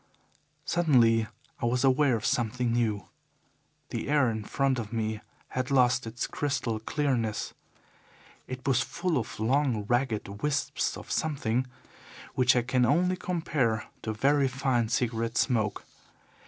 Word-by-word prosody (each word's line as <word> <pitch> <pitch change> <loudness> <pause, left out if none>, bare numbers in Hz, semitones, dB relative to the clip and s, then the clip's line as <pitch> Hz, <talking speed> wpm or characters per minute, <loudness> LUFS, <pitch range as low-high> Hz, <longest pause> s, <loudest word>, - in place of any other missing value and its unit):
"Suddenly 120 -10 +3 0.3
I 120 - +1
was 120 +1 +1
aware 135 -1 +4
of 110 - -4
something 120 0 0
new. 110 -4 0 0.9
The - - -3
air 145 -5 +3
in 110 -1 -4
front 135 +3 0
of 110 -2 -6
me 110 -2 -2 0.3
had 130 0 -2
lost 125 -2 +3
its 115 +2 -3
crystal 135 -6 -2
clearness. 115 -3 -1 0.9
It 130 +1 -7
was 130 -2 +3
full 175 -7 -1
of 110 - -6
long, 120 -2 +1
ragged 110 -4 -1
wisps 150 -1 -1
of - - -10
something 130 -5 0 0.7
which 125 -1 +4
I 120 - +2
can 125 +1 +1
only 175 +8 +3
compare 150 -11 -1 0.2
to 110 - -3
very 135 +5 +2
fine 130 -4 0
cigarette 115 -1 -1
smoke. 110 -5 0
125 Hz, 135 wpm, -28 LUFS, 115-140 Hz, 0.9 s, aware